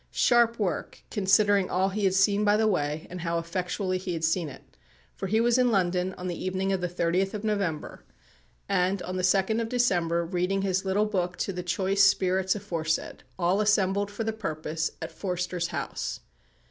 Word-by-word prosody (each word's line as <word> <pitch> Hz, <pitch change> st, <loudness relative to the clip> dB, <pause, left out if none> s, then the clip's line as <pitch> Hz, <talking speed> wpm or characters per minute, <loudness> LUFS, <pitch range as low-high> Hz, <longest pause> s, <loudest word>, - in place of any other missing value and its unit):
Sharp 235 Hz, -1 st, +3 dB
work, 200 Hz, -5 st, -3 dB
considering 200 Hz, -1 st, +3 dB
all 190 Hz, +2 st, +1 dB
he 200 Hz, +1 st, -1 dB
had 190 Hz, -1 st, +2 dB
seen 200 Hz, +2 st, +3 dB
by 205 Hz, 0 st, +4 dB
the 220 Hz, -, +2 dB
way, 150 Hz, -5 st, -1 dB
and 180 Hz, -1 st, -6 dB
how 170 Hz, 0 st, -1 dB
effectually 185 Hz, +2 st, -2 dB
he 185 Hz, -1 st, -4 dB
had 165 Hz, -1 st, -4 dB
seen 165 Hz, 0 st, +1 dB
it, 130 Hz, -, -12 dB, 0.5 s
for 195 Hz, -, -4 dB
he 220 Hz, +4 st, +2 dB
was 240 Hz, +2 st, +3 dB
in 250 Hz, -1 st, +4 dB
London 185 Hz, -3 st, +1 dB
on 180 Hz, -, -7 dB
the 175 Hz, -2 st, -4 dB
evening 190 Hz, +1 st, -1 dB
of 190 Hz, -, -1 dB
the 180 Hz, -, -1 dB
30th 180 Hz, +3 st, 0 dB
of 210 Hz, -, -5 dB
November, 200 Hz, -8 st, -2 dB, 0.6 s
and, 185 Hz, +1 st, +1 dB
on 185 Hz, -, -5 dB
the 185 Hz, -, -1 dB
2nd 195 Hz, +4 st, +2 dB
of 225 Hz, -, -3 dB
December, 175 Hz, -9 st, +1 dB
reading 180 Hz, +3 st, -1 dB
his 190 Hz, 0 st, 0 dB
little 195 Hz, +2 st, +2 dB
book 180 Hz, -4 st, -2 dB
to 195 Hz, -, -2 dB
the 180 Hz, -, -4 dB
choice 190 Hz, +3 st, +1 dB
spirits 190 Hz, 0 st, +3 dB
aforesaid, 165 Hz, -6 st, -3 dB, 0.2 s
all 185 Hz, +3 st, +2 dB
assembled 200 Hz, -1 st, +2 dB
for 205 Hz, +2 st, -4 dB
the 220 Hz, 0 st, -1 dB
purpose 160 Hz, -5 st, -3 dB
at -, -, -5 dB
Forster's 180 Hz, -2 st, -2 dB
house. -, -, -4 dB
190 Hz, 190 wpm, -27 LUFS, 180-205 Hz, 0.6 s, by